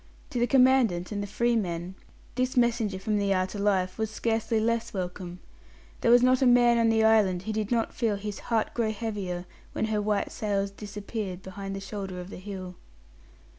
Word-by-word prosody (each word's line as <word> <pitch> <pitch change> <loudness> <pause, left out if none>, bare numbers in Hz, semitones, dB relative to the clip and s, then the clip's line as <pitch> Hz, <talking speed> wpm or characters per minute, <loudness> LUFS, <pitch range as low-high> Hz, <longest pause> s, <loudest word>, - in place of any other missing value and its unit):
To 245 - -2
the 240 - +2
Commandant 250 -10 +3
and 205 -1 -2
the 205 - -4
"free 235 +4 +1
men" 175 -4 -2 0.4
this 255 0 -1
messenger 235 -5 +2
from 210 +2 -1
the 200 -1 +1
outer 185 +2 -1
life 190 -1 +1
was 220 -1 0
scarcely 225 0 0
less 230 0 -1
welcome. 180 -1 -5 0.6
There - - +2
was 245 +1 +7
not 255 +1 +4
a 260 - +5
man 240 -1 +5
on 230 -1 +4
the 225 0 +3
island 205 -5 +4
who 215 +2 -3
did 215 -1 -2
not 230 -2 0
feel 225 -4 0
his 205 0 -5
heart 225 -2 +1
grow 225 -2 0
heavier 200 -5 -4 0.3
when - - 0
her 210 - +1
white 205 -1 0
sails 200 -2 -1
disappeared 205 -2 -6
behind 195 +1 -6
the - - -4
shoulder 195 -2 -6
of 180 +2 -8
the - - -7
hill. 185 -1 -7
210 Hz, 195 wpm, -27 LUFS, 190-230 Hz, 0.6 s, was